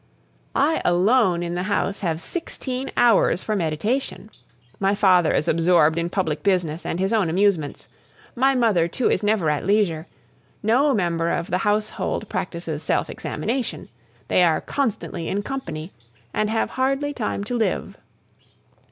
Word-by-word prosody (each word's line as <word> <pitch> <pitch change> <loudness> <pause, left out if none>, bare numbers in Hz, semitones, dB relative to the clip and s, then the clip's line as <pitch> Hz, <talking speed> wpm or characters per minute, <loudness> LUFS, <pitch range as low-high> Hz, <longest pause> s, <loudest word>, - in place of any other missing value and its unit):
I 305 +4 +2
alone 180 0 +3
in 170 0 -3
the 175 - -2
house 200 0 0
have 165 -4 -1
sixteen 265 - -4
hours 230 -6 +4
for 215 - -1
meditation. 210 - -2 0.5
My 195 +1 +2
father 185 -5 +4
is - - 0
absorbed 165 -1 +3
in 170 +1 -2
public 175 -5 -1
business 175 -5 0
and 170 - -2
his 195 +3 0
own 205 -7 +2
amusements; 180 -4 0 0.5
my 265 +2 +2
mother, 215 -9 +3
too, 240 +8 0
is - - +1
never 205 -5 +1
at 150 - -2
leisure; 190 -5 +1 0.6
no 260 +6 +3
member 170 -4 0
of 170 0 -2
the 180 - +1
household 210 +1 -1
practises 170 -4 -4
self - - 0
examination, 235 - -4 0.4
they - - +3
are 165 -2 +3
constantly 220 -10 -3
in 205 +1 -2
company, 170 - -5 0.4
and 215 0 0
have 225 0 0
hardly 275 +2 0
time 215 -5 -3
to 245 +4 -4
live. 225 -2 -1
195 Hz, 150 wpm, -23 LUFS, 170-230 Hz, 0.6 s, hours